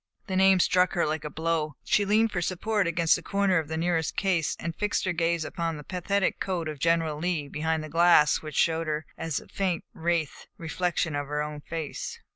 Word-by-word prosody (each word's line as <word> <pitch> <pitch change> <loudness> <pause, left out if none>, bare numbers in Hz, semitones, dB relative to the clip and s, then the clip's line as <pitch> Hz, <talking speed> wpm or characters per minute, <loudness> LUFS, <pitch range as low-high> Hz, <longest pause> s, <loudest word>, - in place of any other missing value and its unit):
The 190 -3 -3
name 190 0 +5
struck 180 +1 +3
her 175 - +1
like 155 0 -2
a 150 - -4
blow. 160 -2 -1
She 205 - +2
leaned 220 +2 +3
for 180 -3 -2
support 195 +3 0
against 170 -1 +3
the - - -5
corner 200 -3 +1
of 160 - -5
the 160 +1 -3
nearest 165 -1 0
case, 180 -6 +1
and 170 0 -4
fixed 210 +1 -1
her 185 - 0
gaze 165 -1 0
on 165 -1 -3
the 150 - -9
pathetic 190 +3 -1
coat 180 -4 -2
of 155 -2 -6
General 165 -1 +1
Lee 165 -3 -1
behind 160 +2 -1
the - - -6
glass 165 -1 +4
which 155 -1 -8
showed 165 0 +2
her 155 0 -2
as 165 -3 -2
a - - -15
faint 185 -4 -1
wraith 165 -2 -2
the - - -12
reflection 165 -1 -1
of 145 -1 -3
her 150 +1 -1
own 150 -1 -6
face. 160 -3 -5
165 Hz, 220 wpm, -27 LUFS, 155-180 Hz, -, name